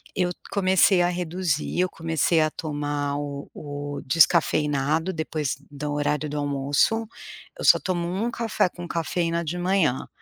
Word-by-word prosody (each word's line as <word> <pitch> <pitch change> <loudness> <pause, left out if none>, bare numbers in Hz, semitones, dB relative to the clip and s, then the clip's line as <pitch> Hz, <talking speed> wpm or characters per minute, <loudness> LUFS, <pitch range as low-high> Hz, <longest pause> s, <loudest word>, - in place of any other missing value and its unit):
eu 180 -1 +1 0.2
comecei 190 -1 +4
a 175 - +3
reduzir, 175 -2 -2
eu 185 0 +2
comecei 165 0 +1
a 155 - +2
tomar 145 -2 -3
o 145 -1 -5
o 145 -1 -6
descafeinado 155 +1 +2
depois 155 -4 -2
do 145 0 -4
horário 150 +1 0
do 150 - -4
almoço. 145 +10 +1 0.5
Eu - - -6
só - - +7
tomo 175 -2 -2
1 205 +7 -1
café 230 -5 0
com 175 0 -8
cafeína 170 +1 -1
de 165 +4 -3
manhã, 175 -7 +1
160 Hz, 145 wpm, -25 LUFS, 145-180 Hz, 0.5 s, só